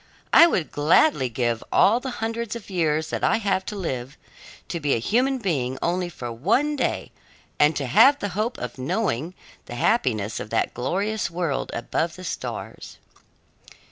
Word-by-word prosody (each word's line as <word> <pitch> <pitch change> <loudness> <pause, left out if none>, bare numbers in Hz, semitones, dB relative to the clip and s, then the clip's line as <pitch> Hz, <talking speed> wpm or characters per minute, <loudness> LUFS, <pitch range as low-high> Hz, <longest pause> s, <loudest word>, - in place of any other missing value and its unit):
"I 335 - +9
would 180 - -1
gladly 145 - +3
give 120 -1 -1
all 225 +4 +5
the 265 - -5 0.2
hundreds 230 0 -3
of 220 -3 -9
years 160 -3 0
that - - -3
I - - +3
have 200 -3 0
to 210 - -4
live, 135 -8 -4 0.5
to 170 - -4
be 145 -3 +1
a - - +1
human 250 - +1
being 135 - -1
only 175 +1 -1
for 120 -7 -7
one 230 - +1
day - - -2 0.5
and 150 +1 +4
to 140 - -2
have 240 - +6
the 205 - -3
hope 215 +6 -2
of 125 +1 -6
knowing 160 - -2 0.3
the 120 - -7
happiness 115 - 0
of - - -6
that 115 - 0
glorious 200 - -1
world 170 -5 -2
above 160 +7 -2
the 185 - -10
stars." 175 - -6
170 Hz, 170 wpm, -24 LUFS, 130-220 Hz, 0.5 s, I